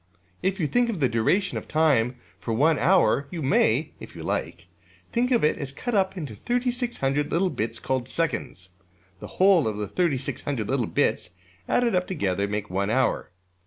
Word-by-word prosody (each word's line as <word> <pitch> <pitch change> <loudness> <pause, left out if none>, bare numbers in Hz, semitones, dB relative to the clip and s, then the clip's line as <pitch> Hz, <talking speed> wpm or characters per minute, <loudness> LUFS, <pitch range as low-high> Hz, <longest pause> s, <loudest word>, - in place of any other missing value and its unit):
'' 90 0 -37
If 195 +1 -7
you 165 - +1
think 245 +9 +2
of 205 -7 -3
the 135 - +3
duration 120 - +1
of - - -14
time 140 -6 +2 0.2
for 115 - -3
one 150 +5 +3
hour, 160 -2 +3
you 165 -1 -5
may 135 +1 +2
(if - - -11
you - - -8
like) 85 0 -3 0.5
think 245 +2 +1
of 240 -3 +2
it 150 - +2
as 140 -3 -4
cut 240 - -5
up 190 -2 +1
into 150 -10 -5
$3600$ 240 - -1
little 180 +2 +1
bits 115 +2 -3
called 130 -1 -2
seconds. 95 - -3 0.5
The - - -8
whole 185 - +5
of 105 -1 -2
the 105 -1 -3
$3600$ 135 - -1
little 130 -2 0
bits - - 0 0.4
added 240 -2 +2
up 180 0 +1
together 100 - -1
make 105 0 -3
one 100 +2 -1
hour. 130 -3 +1
145 Hz, 185 wpm, -25 LUFS, 115-185 Hz, 0.5 s, whole